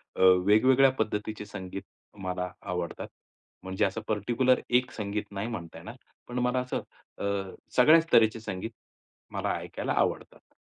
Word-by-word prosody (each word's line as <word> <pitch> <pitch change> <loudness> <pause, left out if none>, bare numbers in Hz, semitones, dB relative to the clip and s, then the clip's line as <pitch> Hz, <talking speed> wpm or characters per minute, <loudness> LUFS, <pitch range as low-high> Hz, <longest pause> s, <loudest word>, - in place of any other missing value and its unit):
अ, - - -9 0.3
वेगवेगळ्या 130 +6 +6
पद्धतीचे 105 -1 -2
संगीत 95 -1 -7 0.4
मला 90 0 -2
आवडतात. 90 -3 -4 0.6
म्हणजे 95 +1 0
असं 100 +3 -2
पर्टिक्युलर 120 +5 +2
एक 125 +1 +2
संगीत 105 -1 -3
नाही 100 +3 -3
म्हणता 85 -8 -6
येणार. 110 +9 -9 0.3
पण 125 +1 -3
मला 125 +1 +1
असं 125 0 -2 0.4
अ, - - -4 0.5
सगळ्याच 160 +6 +6
तऱ्हेचे 110 0 +5
संगीत 105 +1 -5 0.6
मला - - -1
ऐकायला - - -4
आवडतात. - - -2
110 Hz, 135 wpm, -28 LUFS, 95-125 Hz, 0.6 s, वेगवेगळ्या